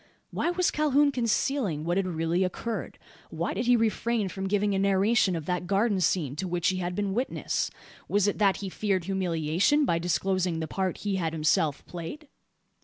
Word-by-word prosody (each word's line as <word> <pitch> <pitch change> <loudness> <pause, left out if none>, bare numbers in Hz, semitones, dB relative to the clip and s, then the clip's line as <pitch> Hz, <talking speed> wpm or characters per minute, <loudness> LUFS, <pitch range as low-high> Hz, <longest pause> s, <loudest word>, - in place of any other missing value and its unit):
Why - - 0
was 355 0 +1
Calhoun 295 -1 +3
concealing 230 - 0
what 175 +2 0
had 195 -1 +1
really 165 +1 0
occurred? 220 +5 -4 0.3
Why - - -2
did 240 - -2
he 245 - +6
refrain 225 -2 0
from 190 +1 -4
giving 205 +1 +1
a 195 - +1
narration 200 0 +3
of 160 -3 -4
that 180 0 -2
garden 200 +1 +2
scene 150 -5 +1
to 185 +3 -2
which 175 -1 +1
he 185 - -1
had 180 -1 -3
been 200 -1 -1
witness? 250 +5 -1 0.4
Was 205 0 +2
it, 205 - -1
that 200 -2 +3
he - - -3
feared 195 -2 -1
humiliation 185 - +1
by 170 -9 +1
disclosing 180 0 0
the 160 - -3
part 190 0 -2
he 200 -2 0
had 165 -3 -1
himself 155 -1 +1
played? 180 - -7
190 Hz, 185 wpm, -27 LUFS, 175-220 Hz, 0.4 s, he